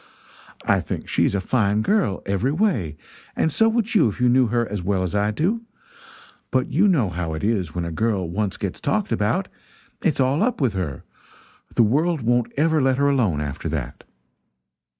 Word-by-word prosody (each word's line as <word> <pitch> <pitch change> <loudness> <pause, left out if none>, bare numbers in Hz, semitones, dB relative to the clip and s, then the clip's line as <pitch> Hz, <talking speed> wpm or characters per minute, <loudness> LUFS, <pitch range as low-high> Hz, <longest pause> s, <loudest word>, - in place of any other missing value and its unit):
I - - +3
think - - -5
she - - +2
is - - 0
a - - +1
fine 105 0 +1
girl 195 - +1
every 100 +7 0
way, 145 - 0 0.4
and 160 - +1
so 225 +8 +3
would 230 0 -1
you 170 - +4
if 100 - -8
you 125 0 +3
knew 125 0 +4
her 120 +1 0
as 105 -3 -4
well 95 +1 0
as 90 - -3
I 105 0 +1
do; 180 - 0 0.9
but 130 -1 0
you 185 +8 +4
know 140 - +2
how 85 -2 -3
it 80 - -6
is 100 -7 -1
when 85 -1 -2
a 85 - -4
girl 100 0 0
once 95 +3 -2
gets - - -4
talked - - -1
about - - 0 0.5
it's 155 - 0
all 135 +4 +2
up 245 +3 +1
with 130 -8 +1
her 85 -8 -4 0.7
the 120 - +5
world 155 +8 +1
won't 120 0 +1
ever 160 +1 +3
let 130 -1 +2
her 140 0 +3
alone, 105 - +1
after 75 -2 -4
that." - - -5
115 Hz, 195 wpm, -22 LUFS, 95-150 Hz, 0.9 s, the